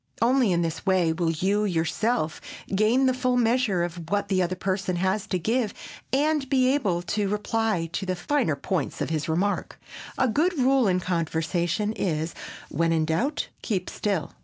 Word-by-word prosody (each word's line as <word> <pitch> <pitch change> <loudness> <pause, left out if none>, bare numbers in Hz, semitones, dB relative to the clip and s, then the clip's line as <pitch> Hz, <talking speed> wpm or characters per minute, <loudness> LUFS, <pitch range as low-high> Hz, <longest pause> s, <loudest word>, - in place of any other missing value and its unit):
Only 245 -2 +3
in 170 -1 +2
this 165 -1 -3
way 180 -4 +2
will 165 0 0
you 190 +6 +1
yourself 175 +1 0 0.3
gain 220 +7 +3
the 260 - +3
full 255 0 +1
measure 230 -6 +2
of 170 -1 -5
what 205 +1 0
the 190 -2 +2
other 180 +1 0
person 190 0 -1
has 190 +3 0
to 185 - 0
give 220 +4 0 0.4
and 290 0 +1
be 260 -1 +3
able 190 -11 0
to 205 +2 -1
reply 210 -3 0
to 190 +2 -3
the 185 - 0
finer 215 - 0
points 185 +5 -2
of - - -2
his 155 -1 -2
remark. 190 +6 -1 0.4
A 260 - +3
good 315 +10 +1
rule 265 -2 +3
in 185 -1 +2
conversation 170 +4 -1
is 160 -5 -2 0.4
"when 165 +3 +1
in 160 -1 +2
doubt 235 - -1
keep 190 -5 -2
still." 195 -8 -2
195 Hz, 175 wpm, -26 LUFS, 170-240 Hz, 0.4 s, Only